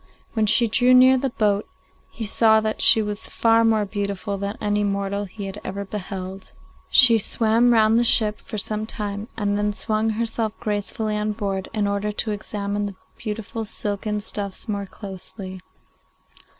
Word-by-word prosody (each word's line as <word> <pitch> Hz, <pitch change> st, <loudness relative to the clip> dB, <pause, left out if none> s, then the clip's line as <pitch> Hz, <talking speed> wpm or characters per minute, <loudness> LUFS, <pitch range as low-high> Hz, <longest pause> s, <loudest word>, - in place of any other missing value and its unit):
When 220 Hz, -2 st, +1 dB
she 235 Hz, +3 st, +5 dB
drew 250 Hz, +3 st, +4 dB
near 255 Hz, +1 st, +7 dB
the 270 Hz, +1 st, -1 dB
boat 210 Hz, -3 st, 0 dB, 0.4 s
he 225 Hz, -, -6 dB
saw 220 Hz, +1 st, +4 dB
that 215 Hz, 0 st, -2 dB
she 220 Hz, -, +7 dB
was 210 Hz, 0 st, -2 dB
far 230 Hz, 0 st, +3 dB
more 220 Hz, -2 st, +2 dB
beautiful 200 Hz, 0 st, -3 dB
than 200 Hz, +2 st, -4 dB
any 210 Hz, 0 st, 0 dB
mortal 200 Hz, 0 st, -2 dB
he 200 Hz, +1 st, -8 dB
had 195 Hz, +2 st, -7 dB
ever 200 Hz, +1 st, -5 dB
beheld. 190 Hz, -1 st, -7 dB, 0.4 s
She 235 Hz, -4 st, +8 dB
swam 225 Hz, +3 st, +2 dB
round 220 Hz, 0 st, +4 dB
the -, -, +3 dB
ship 215 Hz, -2 st, +3 dB
for 215 Hz, -, -7 dB
some 215 Hz, +1 st, -3 dB
time, 205 Hz, -1 st, -5 dB
and 205 Hz, -1 st, 0 dB
then 210 Hz, 0 st, 0 dB
swung 215 Hz, +1 st, -1 dB
herself 220 Hz, 0 st, -2 dB
gracefully 210 Hz, +1 st, -2 dB
on 210 Hz, 0 st, -1 dB
board, 195 Hz, -3 st, -3 dB
in 210 Hz, -2 st, -1 dB
order 200 Hz, +1 st, -1 dB
to 215 Hz, +1 st, -2 dB
examine 205 Hz, 0 st, -3 dB
the 200 Hz, -, -8 dB, 0.2 s
beautiful 225 Hz, 0 st, -5 dB
silken 210 Hz, 0 st, -3 dB
stuffs 205 Hz, 0 st, -5 dB
more 200 Hz, -2 st, -3 dB
closely. 190 Hz, -1 st, -9 dB
210 Hz, 165 wpm, -22 LUFS, 200-220 Hz, 0.4 s, She